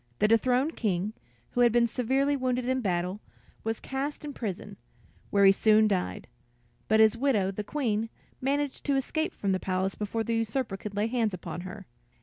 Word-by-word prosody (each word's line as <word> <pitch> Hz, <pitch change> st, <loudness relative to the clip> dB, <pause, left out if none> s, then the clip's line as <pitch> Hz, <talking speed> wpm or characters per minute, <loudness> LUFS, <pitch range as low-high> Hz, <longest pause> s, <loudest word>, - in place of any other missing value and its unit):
The 210 Hz, -, +3 dB
dethroned 250 Hz, +7 st, +2 dB
King, 200 Hz, -1 st, -1 dB, 0.4 s
who 245 Hz, -, +1 dB
had 240 Hz, -1 st, +6 dB
been 240 Hz, +1 st, +4 dB
severely 265 Hz, +5 st, +1 dB
wounded 255 Hz, -2 st, -1 dB
in 260 Hz, 0 st, +1 dB
battle, 180 Hz, 0 st, -1 dB, 0.4 s
was 225 Hz, 0 st, -2 dB
cast 280 Hz, +3 st, -4 dB
in 290 Hz, -, -5 dB
prison, 205 Hz, -3 st, -5 dB, 0.5 s
where 200 Hz, -1 st, +4 dB
he 195 Hz, -, +9 dB
soon 215 Hz, +2 st, +4 dB
died; 190 Hz, -4 st, -2 dB, 0.6 s
but 220 Hz, 0 st, +4 dB
his 220 Hz, 0 st, +6 dB
widow, 230 Hz, -7 st, +1 dB
the 205 Hz, +2 st, -4 dB
Queen, 225 Hz, -3 st, -1 dB, 0.3 s
managed 280 Hz, +1 st, -1 dB
to 280 Hz, -, +2 dB
escape 315 Hz, +4 st, -1 dB
from 200 Hz, -, -1 dB
the 185 Hz, -, +1 dB
palace 185 Hz, +1 st, -1 dB
before 215 Hz, +2 st, -2 dB
the 230 Hz, -, -2 dB
usurper 225 Hz, -1 st, -1 dB
could 200 Hz, +1 st, -7 dB
lay 205 Hz, +1 st, +1 dB
hands 225 Hz, -4 st, 0 dB
upon 175 Hz, 0 st, -6 dB
her. 185 Hz, +2 st, -8 dB
225 Hz, 180 wpm, -28 LUFS, 200-255 Hz, 0.6 s, he